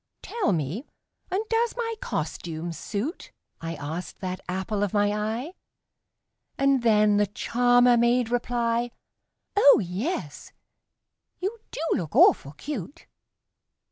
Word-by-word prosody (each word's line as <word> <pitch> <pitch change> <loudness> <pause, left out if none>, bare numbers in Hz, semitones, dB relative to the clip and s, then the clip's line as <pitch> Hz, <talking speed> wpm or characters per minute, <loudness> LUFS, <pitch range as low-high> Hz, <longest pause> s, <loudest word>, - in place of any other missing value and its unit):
"Tell 460 - 0
me 170 - -2 0.4
and 385 +4 0
does 460 +1 0
my 460 -1 -1
costume 170 - -4
suit?" 220 - -4 0.3
I 165 0 -4
asked 160 +5 -6
that 185 -1 -4
apple 190 +3 -2
of 205 0 -1
my 205 0 +3
eye 220 - -3 1.0
And 275 -1 +3
then 210 -2 +4
the 205 0 +3
charmer 245 +3 +3
made 235 0 +2
reply, 240 -1 0 0.7
"Oh, 345 -9 +7
yes, 185 - -4 0.9
you 405 +5 -3
do - - -6
look 165 -3 -3
awful 140 - +5
cute!" 280 - -7
225 Hz, 115 wpm, -26 LUFS, 185-275 Hz, 1.0 s, Oh